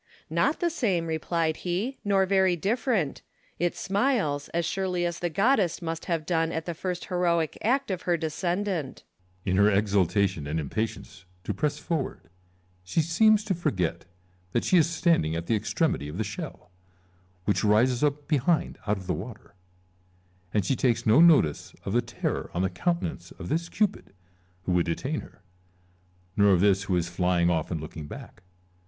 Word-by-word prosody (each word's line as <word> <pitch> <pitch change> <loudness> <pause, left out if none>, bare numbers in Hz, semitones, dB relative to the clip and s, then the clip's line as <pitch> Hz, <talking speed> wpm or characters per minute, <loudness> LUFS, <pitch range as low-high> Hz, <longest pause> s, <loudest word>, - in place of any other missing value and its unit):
" - - -30
Not - - +1
the 345 -1 +2
same," 195 - 0
replied 160 0 -1
he, 190 +9 -2
" - - -46
nor 195 -2 +3
very 190 -1 +3
different: 205 - 0 0.4
it 175 0 0
smiles, 195 - 0
as 170 0 -1
surely 180 -1 -1
the 175 0 -2
goddess 195 - +2
must 165 -2 -4
have 165 -3 -1
done 165 -1 +1
at 160 -1 -3
the 170 - -3
first 180 +2 -4
heroic 170 -3 +1
act 265 +1 +1
of 185 -1 -3
her 175 -1 +1
descendant." 175 0 -2 0.4
Ccesar. 95 - 0
In 95 - +2
her 100 +1 +6
exultation 100 -4 +1
and 80 +2 -1
impatience 95 +3 -4 0.2
to - - -2
press 150 -1 -1
forward 135 - -4 0.5
she 90 - -1
seems 210 +7 +4
to 210 - 0
forget 95 - -1 0.5
that 120 - +1
she - - +2
is 160 0 +3
standing 165 - +2
at 85 0 -3
the 115 - +1
extremity 110 - 0
of 75 +4 -6
the 110 - 0
shell, 110 - -7 0.7
which 100 -1 +1
rises 120 +5 +3
up 145 0 0
behind 155 +3 +1
out 105 0 +1
of 95 - -9
the - - 0
water; 105 +2 -8 1.0
and 105 -3 +1
she 130 - +1
takes 120 -2 +1
no 115 +7 +6
notice 155 - +4
of 95 - -2
the 120 - +3
terror 120 -1 -3
on 90 - +1
the 95 - 0
counten 170 - 0
ance - - -13
of - - -8
this 170 +3 -1
Cupid 205 - -1 0.5
who 90 - -2
would 90 -1 +2
detain 135 - -2
her, 100 - -13 0.9
nor 100 -1 +5
of 90 - +3
this 100 +1 +3
who 95 - 0
is 85 -1 0
flying 90 0 +1
ofF 80 -3 -1
and 85 - -2
looking 75 0 -7
back. 90 - -10
155 Hz, 180 wpm, -27 LUFS, -, 1.0 s, her